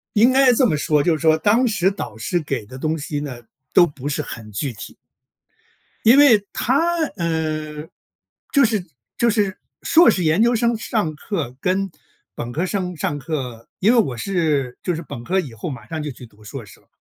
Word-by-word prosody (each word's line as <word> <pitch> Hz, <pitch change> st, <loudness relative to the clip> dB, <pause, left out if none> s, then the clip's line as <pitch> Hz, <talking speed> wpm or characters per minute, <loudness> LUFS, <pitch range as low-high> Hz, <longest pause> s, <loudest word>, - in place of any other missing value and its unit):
应 230 Hz, +5 st, +5 dB
该 265 Hz, -1 st, +5 dB
这 250 Hz, +2 st, +3 dB
么 160 Hz, -, +1 dB
说， 150 Hz, 0 st, +2 dB
就 170 Hz, +2 st, +2 dB
是 -, -, -10 dB
说 160 Hz, 0 st, +4 dB
当 215 Hz, +9 st, +3 dB
时 210 Hz, -5 st, +2 dB
导 195 Hz, -, -6 dB
师 140 Hz, +11 st, -1 dB
给 135 Hz, -7 st, -3 dB
的 130 Hz, +4 st, -10 dB
东 155 Hz, +3 st, -1 dB
西 145 Hz, 0 st, -4 dB
呢， 135 Hz, -5 st, -6 dB, 0.3 s
都 175 Hz, -, +6 dB
不 140 Hz, -3 st, -6 dB
是 150 Hz, +1 st, -1 dB
很 110 Hz, -6 st, -9 dB
具 125 Hz, +6 st, -3 dB
体。 105 Hz, -, -10 dB, 1.1 s
因 230 Hz, +4 st, +7 dB
为 240 Hz, -8 st, +6 dB
他， 330 Hz, +8 st, +1 dB, 0.2 s
嗯， 155 Hz, -2 st, -3 dB, 0.6 s
就 280 Hz, -2 st, +5 dB
是 215 Hz, -5 st, 0 dB, 0.3 s
就 235 Hz, -, +3 dB
是 205 Hz, -3 st, 0 dB, 0.2 s
硕 335 Hz, +2 st, +6 dB
士 180 Hz, -, -1 dB
研 160 Hz, +7 st, +3 dB
究 240 Hz, +1 st, +4 dB
生 235 Hz, 0 st, +1 dB
上 215 Hz, -7 st, -2 dB
课 150 Hz, -, -4 dB
跟 190 Hz, +3 st, 0 dB, 0.4 s
本 120 Hz, +1 st, -5 dB
科 160 Hz, +7 st, -1 dB
生 185 Hz, -2 st, -3 dB
上 145 Hz, -1 st, -2 dB
课， 130 Hz, -6 st, -5 dB
因 210 Hz, +5 st, +4 dB
为 245 Hz, -, +4 dB
我 135 Hz, -, +1 dB
是 150 Hz, -5 st, -1 dB
就 180 Hz, -, -1 dB
是 165 Hz, -, -5 dB
本 120 Hz, -6 st, -8 dB
科 190 Hz, +8 st, +1 dB
以 145 Hz, -9 st, -8 dB
后 115 Hz, +9 st, -5 dB
马 120 Hz, -7 st, -8 dB
上 160 Hz, -1 st, -4 dB
就 150 Hz, -, -4 dB
去 125 Hz, -, -12 dB
读 105 Hz, -1 st, -21 dB
硕 120 Hz, +3 st, -7 dB
士 105 Hz, -, -16 dB
了， -, -, -33 dB
160 Hz, 220 characters per minute, -21 LUFS, 140-210 Hz, 1.1 s, 因